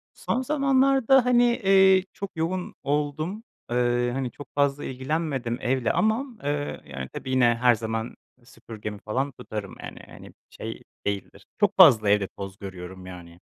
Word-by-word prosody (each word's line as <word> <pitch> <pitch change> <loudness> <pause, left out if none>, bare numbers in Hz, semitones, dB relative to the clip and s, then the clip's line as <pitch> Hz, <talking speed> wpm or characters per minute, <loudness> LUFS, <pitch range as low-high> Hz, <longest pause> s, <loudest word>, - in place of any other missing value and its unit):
Son 255 - -1
zamanlarda, 270 -2 +3
hani, 245 -1 +4
eee, 195 -5 +5
çok 200 -1 -6
yoğun 180 +3 -2
oldum. 150 +8 -2 0.3
Eee, 120 0 +1
hani, 130 -2 -2
çok 145 - -11
fazla 140 0 +1
ilgilenmedim 130 -2 -2
evle 125 -1 +1
ama, 220 +5 +1 0.2
eee, 145 0 -2
yani, 65 -1 -7
tabii - - -6
yine 120 -2 +4
her 125 -1 +5
zaman 110 +1 -4 0.3
süpürgemi 105 -3 -9
falan 135 +6 -2
tutarım 110 -5 -7
yani, - - -8
hani, - - -13 0.2
şey - - -7 0.2
değildir, 100 -2 -4
çok - - +2
fazla 110 -2 +7
evde 100 -1 +3
toz 95 0 -9
görüyorum 95 -1 -9
yani. 85 -2 -11
130 Hz, 145 wpm, -25 LUFS, -, 0.3 s, fazla